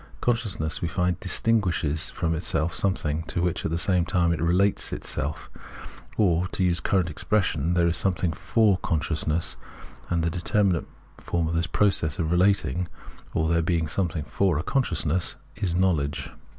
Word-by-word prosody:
Consciousness, 105 -10 -1
we 85 - 0
find, 90 0 0
distinguishes 90 -6 +1
from 80 - -1
itself 80 0 0
something, 80 -5 0
to 85 - -2
which 90 -1 -1
at - - -1
the 80 - -1
same 90 0 +2
time 85 0 +1
it 80 - -3
relates 90 +4 +2
itself; 75 +3 -3 0.7
or, 90 -3 +2
to 95 - -2
use 85 -1 +1
the - - -4
current 90 -4 +2
expression, 85 -2 0
there 85 -1 +3
is 85 0 +3
something 90 -3 +1
for 105 +2 +2
consciousness; 80 0 -1 0.5
and 85 -1 0
the 85 - 0
determinate 90 0 +1 0.3
form 85 -2 -1
of 80 - -2
this 85 0 0
process 90 -5 +1
of 80 -3 -1
relating, 90 -2 +2 0.5
or 80 - +2
of 80 - 0
there 85 0 +3
being 85 -1 0
something 80 -2 -1
for 85 +5 0
a 80 - -2
consciousness, 85 - 0 0.2
is 95 -5 -1
knowledge. 75 -6 0
85 Hz, 165 wpm, -25 LUFS, 80-95 Hz, 0.7 s, there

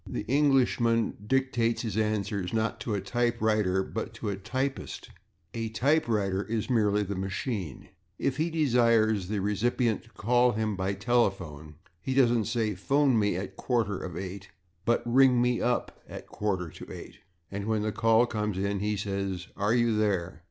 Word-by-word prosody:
The 105 - -4
Englishman 125 -4 +2
dictates 125 -3 +1
his 110 -3 -3
answers, 105 -3 -1
not 115 +1 -1
to 110 -5 -2
a 100 - -2
/typewriter/, 105 -3 +1
but 115 +1 -4
to 110 -2 -3
a - - -2
/typist/; 130 +7 -4 0.4
a 115 -1 -3
/typewriter/ 110 -7 +1
is 115 +2 -2
merely 105 -3 +2
the 100 0 -4
machine. 95 - -4 0.3
If 135 0 -1
he 160 +2 +1
desires 115 - +3
the 105 0 -2
recipient 110 +3 0
to - - -19
call 120 +2 +2
him 110 -1 -1
by 95 +1 -1
telephone 95 -9 -1 0.3
he 130 +8 -2
doesn't 120 -4 +4
say, 110 -2 0
"/phone 135 +5 +2
me/ 105 -3 +1
at 95 +3 -2
a - - -8
quarter 110 -6 -1
/of/ 90 -1 -6
eight," 95 +1 -7 0.4
but 120 - +2
"/ring 125 +1 +5
me 125 0 +1
up/ 125 0 -1
at - - -6
a - - -25
quarter 95 -5 -2
/to/ - - -11
eight." - - -10 0.3
And 100 0 -4
when 110 -1 0
the 110 - -1
call 115 +3 +4
comes 105 -4 -2
he 100 +2 -1
says 100 -2 -3
"/are 105 +3 +1
you 120 -2 +2
there? 100 -5 0
110 Hz, 170 wpm, -28 LUFS, 100-120 Hz, 0.4 s, ring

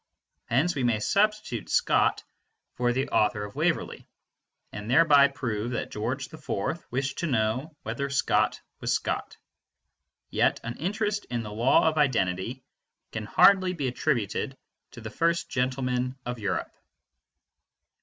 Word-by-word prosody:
Hence 140 +9 +2
we 135 - -2
may 120 -3 +2
substitute 210 - 0
Scott - - +2 0.5
for 120 0 +1
the 130 +2 -1
author 105 -1 +2
of 105 0 -7
"Waverley," - - -1 0.6
and 105 +1 -7
thereby 145 0 +6
prove 120 -4 -3
that - - -3
George 130 +6 -3
IV 155 0 -3
wished 135 +2 -2
to 170 - -1
know 130 +5 -1
whether 120 +6 -3
Scott 140 - +1 0.2
was - - -2
Scott. - - -2 0.9
Yet - - +2
an 115 +1 -5
interest 205 +4 -1
in 120 -2 -3
the 105 - -7
law 120 +8 +4
of 155 -1 +1
identity 120 -2 0 0.5
can 110 -1 -4
hardly 185 - +5
be 145 -6 -2
attributed 130 0 -1 0.4
to 120 - -10
the 110 0 -7
first 170 +5 0
gentleman 125 0 -1
of 125 -1 -4
Europe. 105 - -3
130 Hz, 135 wpm, -27 LUFS, 115-155 Hz, 0.9 s, thereby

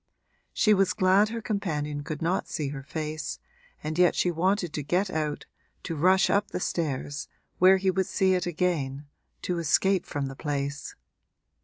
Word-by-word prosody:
She 215 - +3
was 195 -2 +3
glad 190 +3 +4
her 230 0 -5
companion 150 -9 -2
could 155 +2 -5
not 180 +3 0
see 145 -3 -3
her 140 -1 -6
face, 155 +1 -4 0.5
and 155 +2 -3
yet 180 -1 +5
she 180 - +2
wanted 175 0 0
to 150 - -2
get 180 +7 0
out, 150 -2 -2 0.4
to 165 - -4
rush 185 +5 +4
up 205 +1 +2
the - - -3
stairs, 145 -5 -3 0.3
where 185 +1 +7
he 190 0 +1
would 190 0 0
see 190 -2 +2
it 180 -1 0
again, 155 -5 -1 0.4
to 175 -1 -1
escape 185 +4 +2
from 145 -2 -2
the 135 0 -6
place. 140 -1 -4
170 Hz, 170 wpm, -27 LUFS, 150-190 Hz, 0.5 s, where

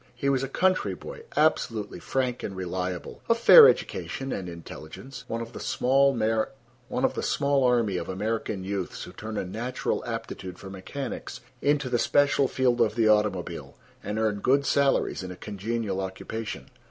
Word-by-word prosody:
He 140 +3 0
was 135 -2 +2
a 135 - -2
country 185 +6 +1
boy, 455 - -10
absolutely 115 - +1
frank 125 +4 -1
and 95 - -5
reliable, 90 -1 -4
of 230 - +4
fair 450 - +10
education 135 0 -2
and 90 -2 -4
intelligence—one 115 +9 -8
of 115 - -7
the - - -7
small 135 +1 +2 1.5
army 120 -6 +2
of - - -5
American 105 0 -2
youths 95 -1 -4
who 90 - -9
turn 110 +3 -6
a - - -1
natural 120 +7 -3
aptitude 115 -6 -5
for 95 - -9
mechanics 120 +8 -6 0.2
into 145 -1 +2
the 120 -1 +1
special 140 0 +3
field 125 -2 +1
of 110 -2 +2
the 115 -2 +3
automobile, 105 -4 0 0.3
and 105 +1 -3
earn 110 -2 0
good 140 +6 +2
salaries 140 -6 +2
in 95 - -6
a 90 - -7
congenial 105 -1 -3
occupation. 100 +4 -6
115 Hz, 155 wpm, -27 LUFS, 95-135 Hz, 1.5 s, fair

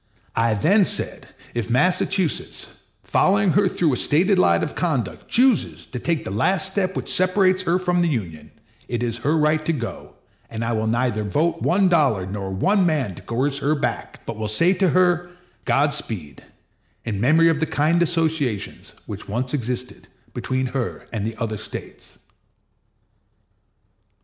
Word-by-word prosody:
I 115 -1 +2
then 195 - +4
said, - - -3 0.3
if 120 -1 -3
Massachusetts, 180 +6 0 0.3
following 200 -1 +2
her 200 +3 +3
through 170 -5 +1
a - - 0
stated 185 - +3
line 85 - +3
of - - -3
conduct, 140 - -2
chooses 250 -2 +2
to 125 - -4
take 165 +3 -1
the - - -5
last 185 - +1
step 190 -1 -1
which - - -1
separates 185 0 +3
her 175 -1 +1
from 180 -1 0
the 175 - +2
Union, 95 - -4 0.4
it 120 0 -2
is 115 -1 -2
her 150 +6 +1
right 155 0 +2
to 165 - 0
go, 115 - -6 0.3
and 115 0 -4
I 115 - -1
will 110 0 -1
neither 115 -1 0
vote 150 - 0
one 190 +2 +3
dollar 140 - +2
nor 95 0 -5
one 190 - +2
man 150 - 0
to - - -11
coerce 135 +4 -1
her 150 +2 +1
back; 145 - -4
but 115 - -6
will 110 -1 -3
say 165 - +3
to 190 -1 +2
her, 175 -1 +2 0.4
Godspeed, 110 - -1 0.6
in 105 -4 -3
memory 160 +6 +5
of 160 -2 +1
the 160 - 0
kind 160 +4 +1
associations 160 - -1
which - - -8
once 125 +5 -2
existed 125 -2 -4 0.3
between 130 0 -2
her 125 -1 -4
and 105 -1 -2
the 115 - -5
other 110 -2 -3
States. - - -8
145 Hz, 165 wpm, -22 LUFS, 115-175 Hz, 0.6 s, memory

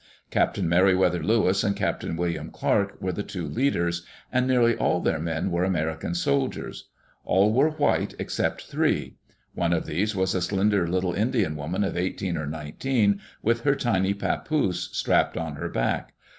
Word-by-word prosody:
Captain - - +1
Meri 90 +3 +4
wether 90 -2 +2
Lewis 105 -3 +2
and 100 -3 +1
Captain - - -2
William 85 -1 -2
Clark - - 0
were - - -2
the - - -3
two - - -5
leaders, 85 -10 0 0.3
and 130 0 +2
nearly 120 -3 +4
all 90 - +1
their 80 - 0
men 80 +3 -2
were 85 +1 +1
American 80 -2 -1
soldiers. 70 -5 -1 0.3
All 100 +3 +3
were 140 +6 +4
white 150 -2 0
except - - -2
three. - - -1 0.4
One 85 0 0
of 85 - 0
these 95 +7 -1
was 95 -1 +1
a 95 - 0
slender 100 0 +1
little 90 0 0
Indian 110 - 0
woman 80 +7 -2
of 95 - -2
eighteen 90 0 -2
or 80 -2 -3
nineteen, 100 - 0 0.2
with 115 +1 +2
her 140 +2 +3
tiny 100 -7 +1
papoose 100 - -1
strapped - - +1
on 80 -2 -3
her - - -4
back. - - -2
95 Hz, 170 wpm, -25 LUFS, 85-110 Hz, 0.4 s, Meri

